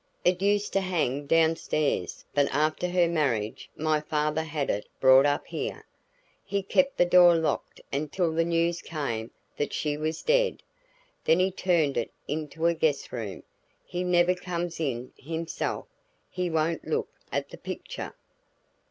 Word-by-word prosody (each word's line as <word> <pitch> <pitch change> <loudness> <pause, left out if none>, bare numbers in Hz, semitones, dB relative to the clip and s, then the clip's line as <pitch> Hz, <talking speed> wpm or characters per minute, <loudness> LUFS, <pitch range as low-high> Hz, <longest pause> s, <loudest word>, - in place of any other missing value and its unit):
"It 180 0 +3
used 205 +1 +1
to 195 - +3
hang 145 -7 -1
down 165 +1 +4
stairs 155 -3 -1
but 145 -1 +3
after 155 +5 +1
her 175 -1 +3
marriage 130 -11 -1
my 155 0 +2
father 150 0 0
had 150 -3 -2
it 105 - -3
brought 130 +1 +7
up 145 0 0
here. - - -5 0.6
He 200 0 -2
kept 275 +7 +2
the 175 - +5
door 175 -1 +7
locked 160 -1 -1
until 155 +4 0
the 165 +1 +2
news 170 0 +1
came 120 -8 -3 0.3
that 145 - -2
she 150 -1 -1
was 155 +1 -3
dead, - - +2 0.6
then 160 - +5
he 185 +1 +2
turned 170 -6 +1
it 120 - -1 0.2
into 155 +2 -3
a 170 - +5
guest 155 -3 0
room. 110 -6 -5 0.4
He 180 +1 -3
never 180 0 +4
comes 175 -2 -4
in 130 -5 -2
himself; 165 +3 -3 0.5
he 180 -1 -1
won't 160 0 0
look - - -1 0.2
at - - -2
the - - -10
picture." - - -6
160 Hz, 155 wpm, -27 LUFS, 145-175 Hz, 0.6 s, brought